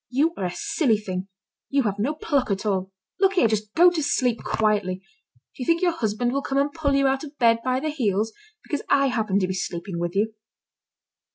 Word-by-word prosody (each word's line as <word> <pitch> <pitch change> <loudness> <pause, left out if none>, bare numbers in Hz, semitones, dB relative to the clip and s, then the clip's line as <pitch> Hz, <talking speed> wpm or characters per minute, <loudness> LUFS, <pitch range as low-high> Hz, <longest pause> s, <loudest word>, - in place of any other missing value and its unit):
You 295 +6 +2
are 190 - -3
a 180 - -2
silly 230 - +1
thing, 190 -2 -5 0.4
you 275 -1 +2
have 205 -2 -2
no 275 +9 0
pluck 285 -5 0
at 200 +1 -2
all. 190 -2 -1 0.3
Look 390 0 +4
here! 360 -12 +4
just 215 -1 -2
go 350 +2 +7
to 340 -3 -1
sleep 250 -5 0
quietly. 210 -4 +1
Do 185 - -17 0.6
you - - -2
think 335 +2 +2
your 350 - +4
husband 240 -5 -1
will 275 +2 0
come 270 0 -2
and 285 +1 +1
pull 290 -4 0
you 275 0 +3
out 270 +1 +1
of 295 -1 -10
bed 230 -2 +4
by 255 0 +1
the 310 +2 -2
heels, 220 -6 0 0.3
because 290 - -3
I 275 -1 +4
happen 220 -5 0
to 190 -2 +1
be 190 - -2
sleeping 180 -1 -4
with 175 +1 -3
you?" 215 +2 +1
235 Hz, 220 wpm, -24 LUFS, 200-285 Hz, 0.6 s, go